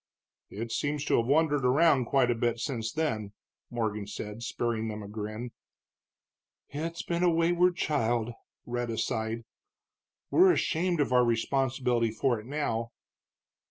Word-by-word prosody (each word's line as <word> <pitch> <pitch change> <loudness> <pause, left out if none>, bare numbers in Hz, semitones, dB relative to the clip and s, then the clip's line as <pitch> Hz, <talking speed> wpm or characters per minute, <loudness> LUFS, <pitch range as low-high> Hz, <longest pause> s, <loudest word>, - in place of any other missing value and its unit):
"It 115 +3 -5
seems 145 +3 -1
to - - +3
have 115 - +1
wandered 145 -1 +3
around 135 0 +4
quite 125 0 +3
a - - +3
bit 120 0 0
since 115 -3 -3
then," 110 -10 -2 0.4
Morgan 110 -4 -2
said, 105 +2 -6
sparing 115 -1 -2
them 105 -1 -5
a - - -8
grin. 110 +3 -5 1.2
"It's 165 +3 -4
been 170 0 -1
a 180 - +5
wayward 175 +2 +3
child," 120 -8 0 0.3
Rhetta 120 -1 -3
sighed. 110 0 -2 0.9
"We're 365 +1 +6
ashamed 170 - +1
of 135 - 0
our 125 0 +6
responsibility 120 0 +1
for 120 +2 0
it 105 - -12
now." 115 -5 -2
120 Hz, 140 wpm, -29 LUFS, 115-150 Hz, 1.2 s, We're